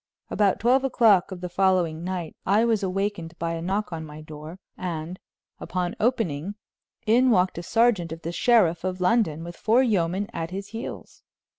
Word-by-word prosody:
About 205 -2 +2
twelve 255 +4 +3
o'clock 220 -8 +4
of 180 -1 -7
the 180 - -3
following 175 -3 +1
night 180 -3 -4
I 210 +4 +3
was 225 -3 +1
awakened 190 -3 -3
by 165 0 -2
a 165 - -4
knock 195 +4 -1
at 165 - -4
my 155 -1 -9
door, 155 +2 -9 0.2
and, 170 0 -5 0.4
upon 180 -1 -3
opening, 205 - 0 0.5
in 245 +4 +4
walked 185 -6 +2
a - - -4
sergeant 210 -4 +2
of 165 +1 -7
the 170 - -3
sheriff 180 -5 +3
of 185 0 -3
London, 180 -4 +1
with 170 0 -8
four 235 +4 +3
yeomen 195 -3 0
at 165 -1 -4
his 195 +2 -6
heels. 225 +2 -8
185 Hz, 175 wpm, -25 LUFS, 170-215 Hz, 0.5 s, o'clock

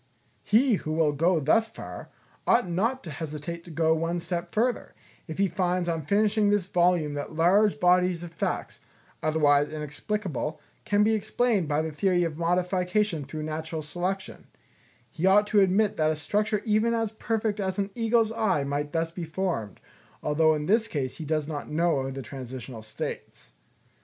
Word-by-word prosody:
He 225 +1 +3
who 155 - -4
will 155 -2 +3
go 165 +4 +2
thus 220 +10 +3
far, - - -9 0.4
ought 235 -4 +4
not 225 +10 0
to 160 - -7
hesitate 160 +3 -6
to - - -11
go 160 0 +2
one 165 +2 -1
step 170 0 -4
further, 240 +2 -1 0.3
if 160 - -6
he 200 0 +3
finds 180 0 0
on 165 -2 -1
finishing 210 +5 +2
this 205 -3 +2
volume 175 -4 +2
that 145 +2 -5
large 190 +6 +3
bodies 180 -1 +3
of 175 - -8
facts, 165 - -3 0.4
otherwise 150 -2 +3
inexplicable, 155 - -3 0.3
can 205 0 +3
be 220 +1 +3
explained 220 -3 +1
by 150 +1 +1
the 160 - -3
theory 180 +3 +1
of 165 -3 -2
modification 180 0 0
through 155 +3 -6
natural 155 +1 -4
selection; 180 +5 -4 0.6
he 180 +2 -1
ought 205 +2 +6
to 210 0 +3
admit 195 +2 +2
that 155 0 +2
a 155 - +1
structure 210 +7 -1
even 220 +2 +2
as 225 -2 -1
perfect 220 -1 -2
as 190 -2 -2
an 200 0 -1
eagle's 225 -1 +2
eye 215 -10 +1
might 145 +1 -3
thus 165 0 0
be 175 +1 -6
formed, 160 - -3 0.4
although 155 +1 +3
in 150 0 -3
this 220 +5 +3
case 130 -3 -3
he 160 - -6
does 155 -1 -1
not 150 -2 -5
know 150 -4 +1
the 135 0 -6
transitional 125 -1 -8
states. 110 0 -7
170 Hz, 170 wpm, -27 LUFS, 155-205 Hz, 0.6 s, ought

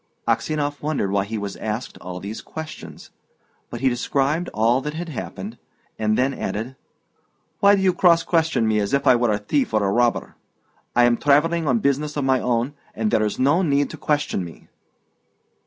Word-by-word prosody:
Aksionov 145 -2 -1
wondered 145 -10 -1
why 100 0 +1
he 110 +2 -4
was 100 -1 -4
asked 110 +3 -4
all 90 0 -7
these 100 +4 -6
questions, 160 0 -9 0.6
but 120 - -7
he 135 - +3
described 140 +7 0
all 115 +4 +2
that 150 +2 -5
had 170 +1 -5
happened, 100 - -7 0.4
and 110 0 +1
then 130 +2 +2
added, 115 +3 -4 0.8
"Why 200 0 +6
do 195 - -1
you 185 -1 +4
cross 170 -2 +4
question 160 -8 +1
me 110 -1 +2
as 100 +6 0
if 140 - -1
I 130 - +6
were 120 -2 +2
a 105 - +1
thief 110 +3 -1
or 110 - +2
a - - +1
robber? 120 +2 +1 0.6
I 120 - +5
am 120 -1 +4
travelling 155 +3 +2
on 125 -3 +3
business 145 +2 0
of 145 - 0
my 130 -1 +3
own, 120 +3 0 0.2
and 110 -1 -1
there - - +3
is 105 - -1
no 145 +7 +3
need 145 -4 +1
to 160 - -8
question 145 -10 -1
me." 85 -2 -12
130 Hz, 190 wpm, -22 LUFS, 110-150 Hz, 0.8 s, Why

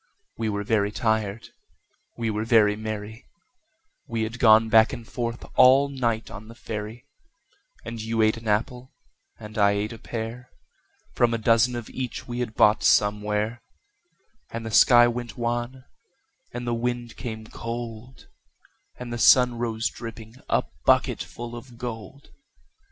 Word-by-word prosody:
We 115 -1 -2
were 105 -1 -2
very 105 -1 +1
tired, 110 -2 -1 0.7
we 115 -1 -1
were 105 +1 -2
very 110 -2 +4
merry 110 +1 -7 0.8
We 115 -1 -2
had 115 +2 -5
gone 110 -1 +6
back 110 0 +5
and 115 -1 -8
forth 120 -1 -4
all 135 +2 +6
night 115 -5 -2
on 110 - -10
the 115 - -12
ferry, 110 +2 -7 0.8
And 115 -1 -6
you 110 0 0
ate 110 0 +3
an 115 0 -10
apple, 125 +4 -2 0.4
and 110 0 -7
I 100 0 +4
ate 105 +2 -2
a 115 - -11
pear, 120 +2 -6 0.6
From 120 -1 +2
a - - -1
dozen 115 +2 +3
of 120 -2 -6
each 130 -2 -5
we 120 0 -5
had 115 -3 -3
bought 105 +1 +4
somewhere; 105 +2 +1 0.9
And 115 0 -6
the 110 - -5
sky 120 +3 +7
went 120 +1 -5
wan, 120 +2 -3 0.7
and 120 0 -6
the 120 - -1
wind 120 0 -3
came 110 -3 -6
cold, 115 +2 -7 0.7
And 120 -1 -7
the 120 - -4
sun 125 0 +5
rose 115 -1 -1
dripping, 115 0 -9
a - - +2 0.2
bucketful 120 0 0
of 120 0 -11
gold. 120 +3 -8
115 Hz, 150 wpm, -25 LUFS, 110-120 Hz, 0.9 s, sky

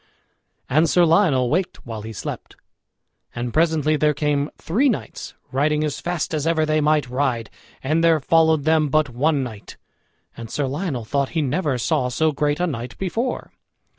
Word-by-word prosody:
And 155 +5 +3
Sir 175 +1 +4
Lionel 160 -8 +3
waked 180 +4 -2
while 115 -3 -6
he 110 +1 -7
slept. 110 - -7 0.8
And 120 0 -4
presently 155 -2 +2
there 150 0 +2
came 145 -1 0
three 245 - +1
knights 225 - -5 0.2
riding 150 +3 +1
as 150 -2 -2
fast 175 -2 -3
as 155 0 -1
ever 160 -1 +2
they 155 0 +1
might 150 -2 +2
ride, 125 -4 -1 0.3
and 155 +5 +1
there 165 -1 +4
followed 160 0 +3
them 155 -1 +2
but 155 -1 +1
one 140 +3 +1
knight. 110 -5 -9 0.6
And 115 -1 -8
Sir 145 - -1
Lionel 135 - -3
thought 140 +3 -1
he 155 - +2
never 145 0 0
saw 125 +1 0
so 155 +5 +1
great 145 +1 -1
a 180 - +2
knight 125 -7 -5
before. 225 +7 -3
150 Hz, 170 wpm, -22 LUFS, 130-160 Hz, 0.8 s, Sir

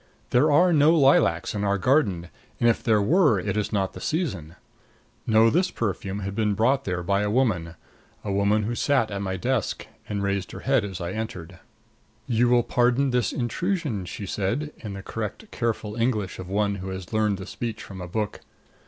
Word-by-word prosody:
There 145 +5 +4
are 175 +4 +5
no 155 +2 +5
lilacs 135 - +3
in 105 -1 -2
our 100 0 +1
garden, 100 - +1 0.3
and 120 - +3
if 115 - +2
there 110 -4 +2
were 150 - +4
it 90 - -2
is 105 -1 -1
not 95 -2 0
the - - -9
season. 95 - -2 0.7
No, 110 0 +5
this 180 +3 +2
perfume 100 - -3
had 100 0 -4
been 105 -1 0
brought 130 +6 +2
there 90 -2 -2
by 100 +2 +1
a 105 - 0
woman 100 -9 0 0.5
a 100 - -3
woman 100 +2 +2
who 115 +3 -2
sat 130 -2 +1
at 100 0 -3
my 95 -1 -2
desk 120 +3 -1 0.2
and 100 -1 -2
raised 100 -1 -2
her - - -7
head 135 -4 +2
as 95 -3 -6
I 85 +1 -3
entered. 95 -5 -6 0.7
"You 120 -1 +2
will 120 -1 +4
pardon 125 +3 +2
this 125 -5 +1
intrusion," 135 - -2
she 100 +3 -6
said 115 +11 -2
in 105 -3 -7
the 100 -1 -7
correct 115 - -6
careful 110 -3 -2
English 115 -5 -1
of 95 -1 -7
one 100 0 0
who 95 0 -6
has 95 +1 -7
learned 105 -2 +1
the 95 - -7
speech 115 +1 -5
from 95 -2 -9
a 90 - -6
book. 105 +3 -3
105 Hz, 195 wpm, -25 LUFS, 95-125 Hz, 0.7 s, are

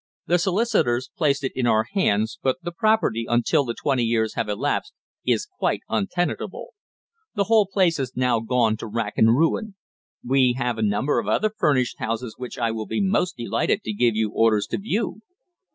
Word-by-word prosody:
The 175 +1 +2
solicitors 180 - +1
placed 145 -7 +1
it 135 - -1
in 125 -2 -1
our 110 -1 +3
hands, 110 - +1
but 130 -1 +1
the 175 - -4
property 195 - +1
until 120 +4 +2
the 120 -3 -4
twenty 135 -3 0
years 115 -1 0
have 115 -2 -2
elapsed, 145 - -2 0.3
is - - +2
quite 380 -2 -2
untenantable. 180 -3 -2 0.7
The 200 - +2
whole 215 -1 +3
place 185 -4 +2
has 130 -3 -4
now 125 -2 +2
gone 115 -1 +1
to 115 - -7
rack 110 -1 -3
and 115 +1 +5
ruin. 195 +6 0 0.5
We 130 -1 +3
have 125 -3 -1
a - - -1
number 105 +7 +1
of - - -5
other 215 0 +1
furnished 140 - +1
houses 115 +1 -3
which 125 -1 -8
I 115 -1 0
will 110 -1 -5
be - - -2
most 190 -2 0
delighted 120 - -1
to 110 - -3
give 115 +1 +2
you 110 -1 0
orders 110 -2 +2
to - - -1
view." 215 +1 -2
125 Hz, 185 wpm, -23 LUFS, 115-180 Hz, 0.7 s, and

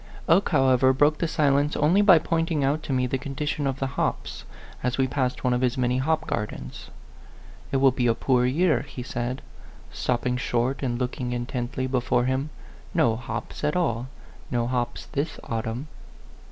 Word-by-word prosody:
Oke, 175 +5 +4
however, 130 -3 +4
broke 145 +3 +3
the 170 - +1
silence 145 -1 +2
only 165 +7 +4
by 195 -4 +7
pointing 165 -2 0
out 145 +3 +1
to 150 - -6
me 130 -1 +2
the 130 +1 -1
condition 145 +1 -2
of 135 -1 -1
the 135 - -1
hops, 130 - -3 0.4
as 125 0 -1
we 135 - +3
passed 130 -1 -1
one 125 -1 +2
of 125 - 0
his 125 -1 +1
many 125 0 +1
hop 160 +4 0
gardens. 65 -12 -5 0.8
"It 135 - +2
will 135 0 +5
be 125 -1 0
a 115 - +3
poor 125 0 +2
year," 160 +6 +2
he 135 -3 -7
said, 125 +1 -4 0.5
stopping 125 0 -1
short 125 +1 -1
and 120 -3 -1
looking 125 0 -3
intently 125 +1 -3
before 125 -1 +1
him 130 +3 -1 0.5
"no 115 -1 +3
hops 120 +5 -6
at 150 +2 +1
all. 125 -9 0 0.4
No 120 -2 0
hops 120 -1 -2
this 145 +3 -3
au 115 -1 -2
tumn." 115 +5 -4
130 Hz, 180 wpm, -25 LUFS, 125-145 Hz, 0.8 s, by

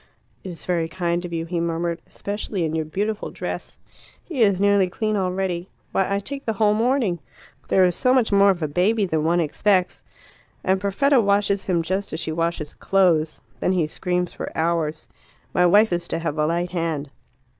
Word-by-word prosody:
"It 190 - -6
is 165 -4 -9
very 170 -3 0
kind 175 0 -1
of 175 - -7
you," 165 -1 -2
he 170 0 -2
murmured, 170 0 -2
"especially 205 -3 -3
in 155 - -2
your 160 -1 -1
beautiful 205 +7 -2
dress. - - -6 0.5
He 300 -8 -4
is 200 -4 +4
nearly 200 -2 +3
clean 215 +3 -1
already. 185 -2 -1 0.2
Why, 195 0 0
I 200 - +2
take 275 +7 -5
the 225 - 0
whole 210 0 +3
morning! 225 -5 +1 0.5
There 185 - +4
is 180 -1 +1
so 255 - +2
much 255 -4 +3
more 200 0 +6
of 180 -4 +1
a - - +1
baby 200 +8 +2
than 160 -4 -1
one 170 +2 +2
expects. 180 +3 +1 0.6
And 190 0 +1
Perfetta 245 +7 +3
washes 200 -1 +1
him 175 -3 +1
just 190 +3 -2
as 160 - -2
she 160 - -2
washes 165 -2 -2
clothes. 170 -5 +2 0.2
Then 185 - +1
he 175 -4 +2
screams 180 +3 -2
for - - -6
hours. 160 -1 -1 0.5
My 180 -1 +4
wife 205 +2 +5
is 175 0 -2
to - - -2
have 165 -2 -3
a 150 - +2
light 170 +2 -1
hand. 160 -5 -2
180 Hz, 195 wpm, -23 LUFS, 165-200 Hz, 0.6 s, more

